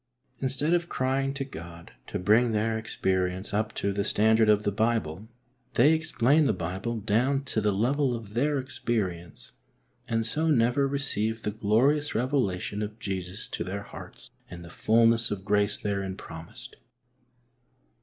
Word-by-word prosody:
Instead 135 +5 0
of 175 0 +1
crying 135 +1 0
to 135 0 -4
God 85 -8 -10 0.2
to - - -3
bring 110 +5 +3
their 110 +1 +1
experience 95 -3 -1
up 105 +1 0
to 100 - -1
the 100 +1 0
standard 110 +2 +3
of 105 0 +4
the 105 - +1
Bible, 110 -3 -1 0.5
they 145 +7 +6
explain 155 -2 +2
the - - +2
Bible 95 +7 -3
down 120 +7 +1
to 115 -5 -2
the 105 0 +2
level 125 +6 +1
of 110 -3 -8
their 145 +5 +1
experience, 90 - -3 0.6
and 115 -2 0
so 155 +8 0
never 125 0 +3
receive 115 -6 -1
the 105 - -1
glorious 120 +8 +2
revelation 110 -6 -1
of 105 +1 -5
Jesus 95 -2 -5
to - - -3
their 100 +3 -5
hearts - - -11 0.2
and 85 -1 -9
the 85 - -11
fulness 115 +1 +3
of 95 -2 -5
grace 105 0 +2
therein 100 -2 -3
promised. 80 0 -10
110 Hz, 155 wpm, -27 LUFS, 100-130 Hz, 0.6 s, they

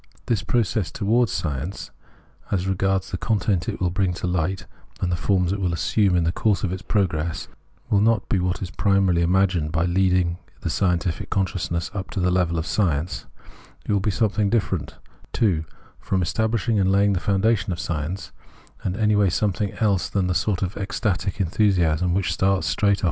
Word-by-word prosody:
This 115 -3 0
pro 115 +3 +2
cess 100 -4 -2
towards 110 +5 +1
science, 80 +1 -4 0.6
as 95 -2 0
regards 95 0 0
the 90 - -3
content 100 -5 0
it - - -5
will 90 -2 0
bring 90 -1 0
to 90 - -4
light 90 +1 -1 0.3
and 90 - -1
the - - +1
forms 90 0 +1
it 100 - -3
will 90 -2 0
assume 90 +4 +2
in 85 - +3
the 85 - +1
course 100 0 0
of 95 -3 0
its 95 - -5
progress, 85 -5 -1 0.4
will 100 - +4
not 110 -2 +2
be 95 - +1
what 90 +1 -1
is 90 - -6
primarily 95 -4 +2
imagined 90 -3 +2
by 80 +1 +1
leading 90 -1 +2 0.2
the 85 - -2
unscientific 90 -1 0
consciousness 90 -3 -1
up 100 -1 -5
to - - -4
the 90 -1 +2
level 90 -2 +1
of 80 - -2
science: 85 -3 -1 0.6
it - - 0
will 100 - +3
be 95 - -1
something 105 -1 +1
different, 100 -7 -1 0.4
too, 90 -8 +1 0.3
from 95 -1 -1
establishing 110 +4 0
and 95 -1 +3
laying 100 +1 +3
the 90 - 0
foundations 100 +1 +1
of 85 - -3
science; 85 +3 -4 0.5
and 95 +1 -2
anyway 105 -3 +3
something 100 +2 0
else 100 -5 +1
than 100 -2 0
the 90 - 0
sort 95 0 0
of 95 +1 -3
ecstatic 100 -1 -2
enthusiasm 90 -3 +2
which 95 -4 0
starts 95 +2 +1
straight 100 -1 +2
of! - - -9
95 Hz, 185 wpm, -23 LUFS, 90-100 Hz, 0.6 s, will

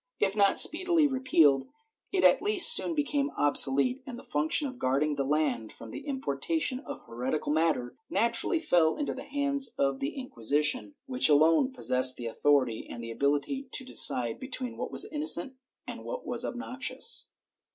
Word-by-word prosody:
If 195 -1 -1
not 200 -2 +2
speedily 340 -1 +3
repealed, 260 - +1 0.4
it 385 - -1
at - - +4
least 420 +3 +8
soon 335 - +3
became 290 -1 -2
obsolete, 145 - +4
and 245 -2 -8
the 255 - -13
fimction 155 - -1
of 255 -2 -11
guarding 140 +4 -1
the 140 - -3
land 135 -6 -2
from 115 - -13
the - - -10
importation 265 - -3
of - - -10
heretical 130 +6 -5
matter 155 -6 -2
naturally 235 - 0
fell 170 - +1
into 290 - -4
the - - -10
hands 280 -1 0
of 135 -1 -1
the 140 - -5
Inquisition, 150 - -3
which 255 - +1
alone 160 - +2
possessed 130 - +1
the 120 - -9
authority 130 -1 -1
and 120 - -9
the 115 - -8
ability 145 - -3
to 260 - -1
decide 120 - +3
between 255 -2 -6
what - - -7
was - - +3
innocent 300 -6 +2 0.3
and - - -9
what - - -8
was - - -1
obnoxious. 255 - -1
205 Hz, 165 wpm, -27 LUFS, -, 0.4 s, least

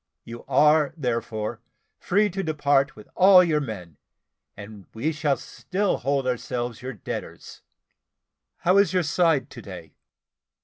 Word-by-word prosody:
You 115 +1 -10
are, 150 +2 +3
therefore, 115 -4 -3 0.4
free 205 +2 +1
to 195 +2 -3
depart 145 -4 +1
with 105 - -14
all 185 0 +7
your 155 -4 +1
men, 90 - -7 0.6
and 100 -1 -11
we 140 +8 -1
shall 150 -3 0
still 195 +1 -2
hold 140 +1 -1
ourselves 125 -1 -3
your 130 +1 -6
debtors. 105 - -8 1.0
How 185 +3 +4
is 200 -1 +2
your 180 -1 +2
side 155 -4 +1
to 120 - -10
day?" 90 -5 -11
140 Hz, 135 wpm, -24 LUFS, 115-165 Hz, 1.0 s, all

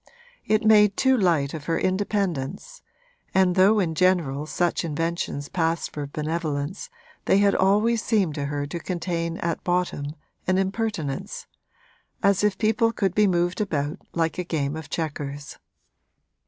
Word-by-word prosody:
It 215 +1 +2
made 210 -2 +5
too 265 0 +4
light 165 - +2
of 155 -2 -6
her 165 0 0
independence, 195 - -2 0.5
and 190 -1 +4
though 195 +4 +5
in 170 -5 0
general 160 -5 +1
such 175 +1 0
inventions 165 -2 -2
passed 165 -1 -1
for 145 -1 -4
benevolence 155 - -3 0.4
they - - +4
had 200 0 +4
always 210 +4 +3
seemed 200 -9 +1
to 145 -1 -3
her 145 0 -2
to 160 +4 -5
contain 170 -1 -3
at 170 -1 -3
bottom 175 -5 -1 0.3
an 185 0 +3
impertinence 195 -7 -2 0.8
as 200 0 +3
if 210 -2 +2
people 225 +1 +2
could 195 -5 -1
be 210 0 +4
moved 175 +1 +1
about 150 -3 -2 0.2
like 165 +1 0
a - - 0
game 150 -4 -2
of 160 -2 -8
chequers. 145 -3 -5
175 Hz, 145 wpm, -24 LUFS, 150-200 Hz, 0.8 s, made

